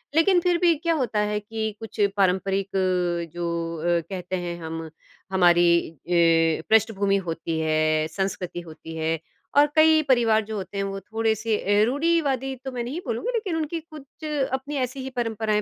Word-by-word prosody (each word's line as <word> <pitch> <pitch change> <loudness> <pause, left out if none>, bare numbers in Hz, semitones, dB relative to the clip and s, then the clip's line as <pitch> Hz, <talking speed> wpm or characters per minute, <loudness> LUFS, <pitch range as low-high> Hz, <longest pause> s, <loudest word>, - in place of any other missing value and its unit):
लेकिन 355 +2 +5
फिर 355 -1 +2
भी 345 -2 +5
क्या 335 +2 0
होता 250 -8 0
है 210 0 -1
कि 220 +1 -4
कुछ 225 0 -10 0.2
पारंपरिक 195 +1 +1
अ, 180 -3 0
जो 170 -1 -3 0.2
अ, - - -4
कहते 185 -1 -4
हैं 175 -1 -4
हम 160 0 -5 0.4
हमारी 175 -2 +4
अ, 165 0 +2
पृष्ठभूमि 200 -2 +3
होती 165 0 -3
है, 155 0 +1
संस्कृति 180 0 -3
होती 160 0 -10
है 160 0 -1 0.4
और 290 - +8
कई 315 0 +6
परिवार 225 -3 +4
जो 220 0 -5
होते 190 +1 -6
हैं 195 - 0
वो 195 0 -4
थोड़े-से 220 +1 -1 0.2
अ, - - +6
रूढ़िवादी 280 -2 0
तो 265 - -3
मैं 245 -1 -3
नहीं 275 +8 -4
बोलूँगी 260 - -2
लेकिन 390 -7 -1
उनकी 325 +1 -2
कुछ 310 0 -14 0.3
अपनी 275 +3 -3
ऐसी 265 +2 -10
ही 265 - -5
परंपराएँ 220 -2 0
205 Hz, 170 wpm, -24 LUFS, 170-265 Hz, 0.4 s, और